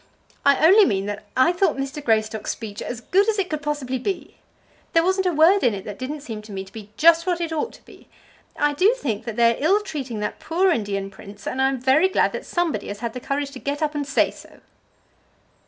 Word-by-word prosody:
"I 280 Hz, +2 st, +4 dB
only 400 Hz, +6 st, +8 dB
mean 195 Hz, -, +1 dB
that 205 Hz, +1 st, -5 dB
I 315 Hz, +7 st, +5 dB
thought 355 Hz, -3 st, +1 dB
Mr. 275 Hz, +2 st, -4 dB
Greystock's 220 Hz, -3 st, 0 dB
speech 210 Hz, -3 st, -5 dB
as 245 Hz, -1 st, -5 dB
good 395 Hz, -, +2 dB
as 435 Hz, -, 0 dB
it 380 Hz, -4 st, -1 dB
could 305 Hz, -1 st, -2 dB
possibly 285 Hz, -3 st, -2 dB
be. 380 Hz, +9 st, -4 dB, 0.6 s
There 330 Hz, -, +4 dB
wasn't 375 Hz, +1 st, +1 dB
a -, -, +2 dB
word 340 Hz, +5 st, +4 dB
in 230 Hz, -4 st, +3 dB
it 195 Hz, -, -8 dB
that 205 Hz, -1 st, -7 dB
didn't 285 Hz, +3 st, -5 dB
seem 225 Hz, -7 st, -7 dB
to 210 Hz, 0 st, -13 dB
me 190 Hz, -1 st, -4 dB
to 190 Hz, -, -17 dB
be 215 Hz, -2 st, -9 dB
just 335 Hz, +2 st, +5 dB
what 355 Hz, -1 st, +1 dB
it 335 Hz, -1 st, -3 dB
ought 320 Hz, +9 st, -2 dB
to -, -, -18 dB
be. -, -, -17 dB, 0.5 s
I 295 Hz, 0 st, +2 dB
do 390 Hz, +11 st, +3 dB
think 230 Hz, -, -3 dB
that 230 Hz, -3 st, -5 dB
they 235 Hz, 0 st, +4 dB
are 275 Hz, -, -7 dB
ill 385 Hz, +7 st, +4 dB
treating 270 Hz, -, -5 dB
that 210 Hz, -, -4 dB
poor 365 Hz, +3 st, +1 dB
Indian 200 Hz, -, -2 dB
prince, 200 Hz, +1 st, -13 dB
and 260 Hz, -, -2 dB
I 265 Hz, -, +4 dB
am 270 Hz, -1 st, -3 dB
very 270 Hz, +9 st, +4 dB
glad -, -, +2 dB
that -, -, -6 dB
somebody 345 Hz, -2 st, -1 dB
has 205 Hz, +1 st, -7 dB
had 235 Hz, -2 st, -3 dB
the 250 Hz, -, -5 dB
courage 275 Hz, +2 st, -3 dB
to 265 Hz, -, -9 dB
get 285 Hz, +3 st, -3 dB
up 300 Hz, 0 st, 0 dB
and 290 Hz, -2 st, -3 dB
say 275 Hz, -, +2 dB
so." -, -, -16 dB
280 Hz, 245 wpm, -23 LUFS, 225-335 Hz, 0.6 s, only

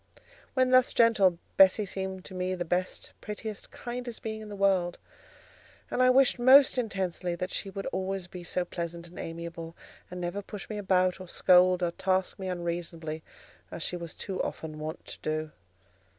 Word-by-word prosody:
When 255 Hz, -1 st, +3 dB
thus 255 Hz, -1 st, +5 dB
gentle, 210 Hz, -7 st, +4 dB, 0.2 s
Bessie 195 Hz, +2 st, +6 dB
seemed 190 Hz, -1 st, -5 dB
to -, -, -8 dB
me 185 Hz, 0 st, -1 dB
the 175 Hz, -1 st, -3 dB
best, 180 Hz, +2 st, -2 dB
prettiest, 210 Hz, 0 st, -6 dB
kindest 245 Hz, -1 st, -6 dB
being 220 Hz, -1 st, -4 dB
in 215 Hz, -, -9 dB
the 205 Hz, -, -6 dB
world; 190 Hz, -3 st, +2 dB, 0.9 s
and 255 Hz, -, +1 dB
I 255 Hz, -, +6 dB
wished 260 Hz, -1 st, +5 dB
most 260 Hz, +1 st, +7 dB
intensely 185 Hz, -5 st, -2 dB
that 180 Hz, +2 st, -4 dB
she 195 Hz, -, -3 dB
would 195 Hz, 0 st, -6 dB
always 190 Hz, -1 st, -2 dB
be 180 Hz, 0 st, -9 dB
so 180 Hz, +1 st, 0 dB
pleasant 170 Hz, -1 st, -5 dB
and 175 Hz, -, -12 dB
amiable, 165 Hz, 0 st, -6 dB, 0.3 s
and 180 Hz, -, -6 dB
never 175 Hz, +3 st, -3 dB
push 205 Hz, 0 st, -8 dB
me 210 Hz, -, -3 dB
about, 185 Hz, -2 st, +2 dB
or 185 Hz, -, -8 dB
scold, 180 Hz, 0 st, +5 dB
or 170 Hz, -, +1 dB
task 185 Hz, +2 st, 0 dB
me 190 Hz, -, -4 dB
unreasonably, 170 Hz, -3 st, -4 dB, 0.5 s
as 165 Hz, -, -5 dB
she -, -, -2 dB
was 170 Hz, -2 st, -7 dB
too 190 Hz, -2 st, -4 dB
often 155 Hz, -1 st, -5 dB
wont 155 Hz, +2 st, -6 dB
to -, -, -8 dB
do. 155 Hz, 0 st, -2 dB
185 Hz, 180 wpm, -29 LUFS, 175-205 Hz, 0.9 s, most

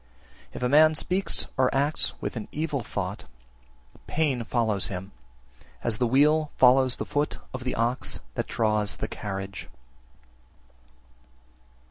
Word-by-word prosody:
If -, -, -6 dB
a -, -, +3 dB
man 155 Hz, +4 st, +6 dB
speaks 185 Hz, +5 st, 0 dB
or 130 Hz, -1 st, +4 dB
acts 145 Hz, +3 st, +1 dB
with -, -, -4 dB
an 110 Hz, -, -5 dB
evil 150 Hz, -3 st, -2 dB
thought, 100 Hz, -2 st, -4 dB, 0.8 s
pain 145 Hz, -6 st, 0 dB
follows 110 Hz, -4 st, +1 dB
him, 95 Hz, +1 st, -6 dB, 0.7 s
as 115 Hz, -2 st, 0 dB
the 125 Hz, -, +2 dB
wheel 150 Hz, +5 st, +4 dB
follows 130 Hz, 0 st, +5 dB
the -, -, -4 dB
foot 145 Hz, +1 st, -1 dB, 0.2 s
of 130 Hz, 0 st, -5 dB
the 125 Hz, -, -1 dB
ox 120 Hz, +3 st, -1 dB
that -, -, -3 dB
draws 105 Hz, -2 st, 0 dB
the 110 Hz, -, -4 dB
carriage. 95 Hz, -3 st, -6 dB
125 Hz, 130 wpm, -26 LUFS, 105-145 Hz, 0.8 s, man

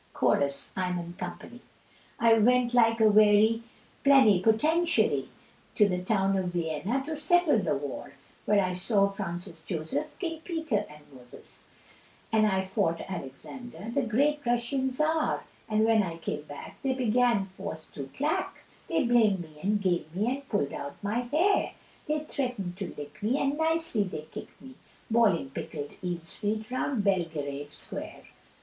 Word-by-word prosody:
Chorus. 140 Hz, -1 st, +1 dB
I'm, 180 Hz, -2 st, -2 dB
&c. 210 Hz, +7 st, -8 dB, 0.6 s
I 230 Hz, -1 st, +6 dB
went 240 Hz, +2 st, +4 dB
like 230 Hz, -1 st, +4 dB
a 220 Hz, -, +6 dB
wary 215 Hz, +2 st, +5 dB, 0.4 s
plenipotentiary, 275 Hz, -, +4 dB, 0.5 s
To 210 Hz, -, +5 dB
the 180 Hz, -2 st, -1 dB
town 195 Hz, 0 st, +1 dB
of 190 Hz, -1 st, 0 dB
Vienna 175 Hz, -, -1 dB
to 315 Hz, +3 st, -4 dB
settle 305 Hz, -3 st, +3 dB
the 180 Hz, -6 st, 0 dB
war, 145 Hz, 0 st, -6 dB, 0.3 s
Where 205 Hz, -1 st, +4 dB
I 185 Hz, -, -2 dB
saw 200 Hz, +2 st, +2 dB
Francis 175 Hz, -4 st, -6 dB
Joseph, 160 Hz, -4 st, -3 dB
King 330 Hz, -4 st, -4 dB
Peter, 320 Hz, -, -2 dB
and 150 Hz, 0 st, -14 dB
Moses, 125 Hz, -1 st, -15 dB, 0.7 s
And 215 Hz, -1 st, +4 dB
I 190 Hz, -2 st, +1 dB
fought 190 Hz, -4 st, 0 dB
Alexander, 190 Hz, -, -7 dB
the 280 Hz, -, +1 dB
great 285 Hz, +6 st, +1 dB
Russian 245 Hz, +3 st, 0 dB
Czar; 305 Hz, +4 st, 0 dB, 0.3 s
And 215 Hz, 0 st, +3 dB
when 225 Hz, -1 st, +4 dB
I 170 Hz, -4 st, -3 dB
came 155 Hz, -2 st, -4 dB
back 145 Hz, -1 st, -10 dB
they 270 Hz, -1 st, +1 dB
began 235 Hz, -5 st, +2 dB
for -, -, -5 dB
to 140 Hz, -, -6 dB
clack, 295 Hz, +3 st, -1 dB, 0.2 s
They 325 Hz, -3 st, +1 dB
blamed 225 Hz, -6 st, +3 dB
me 155 Hz, -2 st, -12 dB
and 205 Hz, +3 st, +1 dB
gamed 175 Hz, -4 st, -1 dB
me 210 Hz, +5 st, +1 dB
and 275 Hz, 0 st, -8 dB
pulled 145 Hz, -10 st, 0 dB
out 140 Hz, 0 st, -6 dB
my 210 Hz, +4 st, 0 dB
hair, 305 Hz, +11 st, +1 dB, 0.3 s
They 305 Hz, 0 st, 0 dB
threatened 245 Hz, -12 st, -3 dB
to 195 Hz, -2 st, -4 dB
lick 145 Hz, 0 st, -9 dB
me, 230 Hz, +6 st, +1 dB
and 275 Hz, +1 st, +1 dB
nicely 320 Hz, -6 st, 0 dB
they 155 Hz, -5 st, -6 dB
kicked -, -, -9 dB
me, 260 Hz, 0 st, -12 dB, 0.4 s
Bawling 205 Hz, -12 st, +3 dB
pickled 145 Hz, +1 st, -6 dB
eel's 175 Hz, -2 st, -5 dB
feet 215 Hz, +2 st, -2 dB
around 255 Hz, -3 st, -1 dB
Bel 190 Hz, -4 st, +2 dB
ge 160 Hz, -1 st, -17 dB
rave 145 Hz, 0 st, -4 dB
Square. -, -, -8 dB
210 Hz, 155 wpm, -28 LUFS, 175-250 Hz, 0.7 s, I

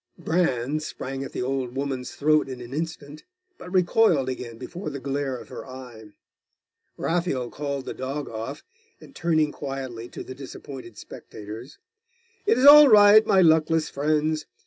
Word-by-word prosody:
Bran 155 Hz, -5 st, 0 dB
sprang 135 Hz, -3 st, -6 dB
at -, -, -7 dB
the -, -, -3 dB
old 130 Hz, -1 st, -3 dB
woman's 135 Hz, -2 st, -4 dB
throat 155 Hz, -1 st, +2 dB
in 130 Hz, -1 st, -7 dB
an 120 Hz, +1 st, -9 dB
instant; 155 Hz, -1 st, -6 dB, 0.4 s
but 180 Hz, -, -10 dB
recoiled 180 Hz, -6 st, +3 dB
again 120 Hz, -3 st, -6 dB
before 170 Hz, -, -7 dB
the 140 Hz, -1 st, -6 dB
glare 135 Hz, 0 st, -3 dB
of -, -, -12 dB
her -, -, -8 dB
eye. 125 Hz, -4 st, -11 dB, 0.9 s
Raphael 165 Hz, -8 st, -1 dB
called 140 Hz, -2 st, -4 dB
the -, -, -5 dB
dog 135 Hz, +3 st, -5 dB
off, 115 Hz, +5 st, -6 dB, 0.4 s
and 275 Hz, -, -16 dB
turning 155 Hz, -3 st, +1 dB
quietly 130 Hz, -5 st, -6 dB
to -, -, -8 dB
the 130 Hz, -, -9 dB
disappointed 130 Hz, -3 st, -10 dB
spectators 110 Hz, +6 st, -10 dB, 0.7 s
'It 435 Hz, -, +4 dB
is 255 Hz, -, +3 dB
all 295 Hz, +1 st, +11 dB
right, 210 Hz, 0 st, +8 dB
my 190 Hz, -, +5 dB
luckless 160 Hz, -1 st, +3 dB
friends. 155 Hz, +1 st, 0 dB
140 Hz, 155 wpm, -25 LUFS, 130-160 Hz, 0.9 s, all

